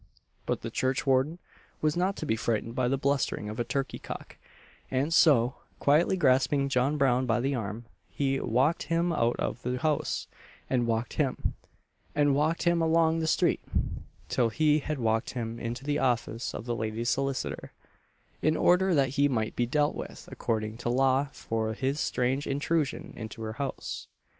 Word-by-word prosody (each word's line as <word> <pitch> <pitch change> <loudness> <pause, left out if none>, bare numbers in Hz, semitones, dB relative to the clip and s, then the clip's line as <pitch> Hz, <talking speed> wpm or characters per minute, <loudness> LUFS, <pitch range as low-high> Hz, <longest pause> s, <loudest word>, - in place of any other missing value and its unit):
But - - -1
the - - -5
churchwarden 135 +4 +1 0.4
was 155 -1 +1
not 185 +3 +1
to - - -5
be 110 - +1
frightened 115 0 -1
by 125 0 +1
"the 135 +2 +1
blustering 135 -6 0
of 110 +3 -6
a - - +2
turkey 135 +2 -2
cock;" - - -8 0.5
and 135 +5 0
so, 135 -7 +5 0.2
quietly 155 +6 +3
grasping 140 -2 +3
John 135 +3 +1
Brown 130 -2 +2
by 115 0 +2
the 135 +3 0
arm, 115 -1 -4 0.2
he 135 -1 0
"walked 130 +8 +2
him 170 +1 +2
out 120 -5 +2
of 120 - -3
the 125 +1 -2
house;" 150 +3 0 0.4
and 120 -2 +1
walked 115 +1 -1
him, 140 -4 -1 0.6
and 145 -1 +4
walked 155 +4 +1
him 170 -1 +3
along 165 0 +3
the 160 - -1
street, - - +2 0.7
till 120 -2 +2
he 150 +5 +3
had 155 +1 -3
walked 115 -2 0
him 115 -2 -4
into 120 +3 -4
the 145 +1 0
office 120 -2 -1
of - - -6
the 120 -1 -1
lady's 110 +1 -1
solicitor, 135 -1 -2 0.7
in 155 +1 +2
order 180 0 +4
that 135 -2 +3
he 140 +2 +3
might 110 -5 -1
be 120 - +1
dealt 145 +3 +2
with - - -8
according 110 -1 -2
to 120 0 -3
law 135 +2 +3
for 110 -3 -2
his 135 +4 -1
strange 130 +2 0
intrusion 145 +2 -1
into 110 0 -7
her 110 0 -4
house. 135 +3 -5
135 Hz, 170 wpm, -29 LUFS, 120-150 Hz, 0.7 s, so